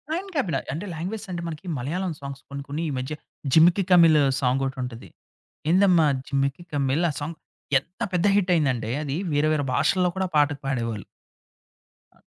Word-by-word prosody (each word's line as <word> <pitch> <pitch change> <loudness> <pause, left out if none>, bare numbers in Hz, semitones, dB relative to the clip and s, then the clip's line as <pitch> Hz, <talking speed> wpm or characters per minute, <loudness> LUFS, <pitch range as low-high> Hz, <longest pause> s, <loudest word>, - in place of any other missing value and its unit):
On 390 +3 -4
క్యాబిన. 175 - 0 0.2
అంటే 175 +7 -4
languages 200 +7 -5
అంటే 170 -1 -3
మనకి 160 +2 -7
'మలయాళం' 165 +7 -3
సాంగ్స్ 140 0 -7
కొన్ని 140 0 -6
కొన్ని 150 +4 -3
ఈ - - -2
మధ్య 130 +4 -3 0.4
'జిమిక్కి 175 +4 +6
కమ్మల్' 165 -3 +7 0.2
సాంగొకటి 135 +1 0
ఉంటది. 120 -1 -8 0.6
'ఎంతమ్మీద 175 -5 +5 0.2
జిమిక్కి 140 +4 -1
కమ్మల్' 140 +4 +1
సాంగ్ 155 +3 -5 0.4
ఎంత 170 +6 -25
పెద్ద 180 +2 +2
హిట్ 190 -2 +2
అయిందంటే 130 -8 0
అది 145 +1 -3 0.2
వేరే 145 +1 +2
వేరే 150 -2 0
భాషల్లో 180 -2 +2
కూడా 190 0 0
పాటకు 145 -1 +3
పాడేవాళ్ళు. 115 -6 -2 1.1
ఆ! - - -29
155 Hz, 155 wpm, -25 LUFS, 135-180 Hz, 1.1 s, కమ్మల్